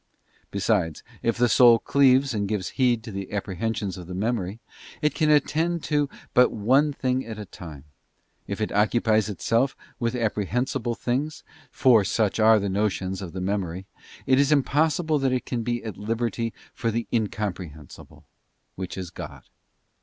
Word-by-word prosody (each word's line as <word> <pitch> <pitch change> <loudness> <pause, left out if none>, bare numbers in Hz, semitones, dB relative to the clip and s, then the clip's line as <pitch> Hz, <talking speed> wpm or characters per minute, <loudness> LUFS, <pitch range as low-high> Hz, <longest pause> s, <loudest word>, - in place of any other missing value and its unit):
Besides, 100 -5 0 0.2
if 115 0 0
the 120 0 +4
soul 120 0 +7
cleaves 135 +1 +3
and 100 -2 -1
gives 100 -3 -2
heed 120 -4 +1
to 115 - -8
the 95 -1 -6
apprehensions 100 -1 -3
of 90 - -9
the 90 - -6
memory—it 115 - -3
can 155 0 +1
attend 160 +3 +2
to 145 -2 +1 0.2
but 125 0 +5
one 130 +8 +3
thing 130 -2 -1
at 110 -1 -7
a 105 - -6
time—if 80 +4 -11
it 110 - -1
occupies 110 0 +2
itself 115 +6 0 0.2
with 115 0 -1
apprehensible 120 +2 -1
things, 140 +7 -2 0.3
for 120 -6 +4
such 105 +2 0
are 110 0 +6
the 100 -1 -1
notions 95 -1 -1
of 90 -4 -7
the 95 - -4
memory, 95 -2 -2 0.4
it 130 0 +4
is 140 +1 +3
impossible 155 +2 +2
that 135 -1 +1
it 125 - -1
can 120 -2 -2
be 120 +1 -2
at 110 -5 -6
liberty 115 +1 -2 0.2
for 115 - -2
the 115 +1 -2
Incomprehensible, 95 - -4 0.5
which 95 0 -6
is 90 -2 -5
God. - - -9
115 Hz, 155 wpm, -25 LUFS, 100-130 Hz, 0.5 s, soul